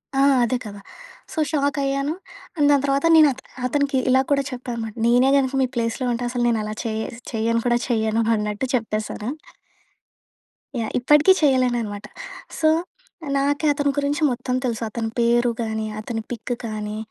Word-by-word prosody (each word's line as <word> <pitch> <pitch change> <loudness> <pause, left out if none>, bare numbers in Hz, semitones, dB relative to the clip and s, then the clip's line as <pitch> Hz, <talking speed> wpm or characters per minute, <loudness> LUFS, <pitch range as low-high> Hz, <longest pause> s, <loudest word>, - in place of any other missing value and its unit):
ఆ! - - +2 0.2
అదే 250 +2 +1
కదా! 205 -1 -8 0.5
సో, - - -12
షాకయ్యాను, 280 0 0 0.4
అండ్ 290 -1 +4
దాని 280 -1 +3
తర్వాత 275 +2 +1
నేను 310 -2 +8
అత 265 - -14 0.3
అతనికి 280 0 0
ఇలా 260 0 +5
కూడా 280 -1 +3
చెప్పా 250 0 -7
అనమాట, 225 -2 -5
నేనే 245 +3 +4
గనక 265 -1 +1
మీ 255 - +1
ప్లేస్‌లో 230 +2 -1
ఉంటే, 235 +1 -3
అసలు 240 0 -1
నేనలా 215 -2 -1
చేస్ 220 +1 -3 0.2
చెయ్యను 230 +1 +1
కూడా 240 0 +3
చెయ్యను 220 -1 +1
అన్నట్టు 210 +4 -2
చెప్పేశాను. 215 -1 -3 1.5
యాహ్! 220 - -2
ఇప్పటికీ 295 +8 +5
చెయ్యలేననమాట. 240 -7 +1 0.5
సో, 315 - +4 0.7
నాకే 285 +2 +1
అతని 285 0 0
గురించి 285 +1 0
మొత్తం 250 +1 -2
తెలుసు. 235 -2 -2
అతని 225 +1 -3
పేరు 240 +1 +3
గానీ, 220 -1 -2
అతని 225 +1 -4
పిక్ 240 +1 -3
కానీ, 215 -1 -4
240 Hz, 150 wpm, -22 LUFS, 225-275 Hz, 1.5 s, నేను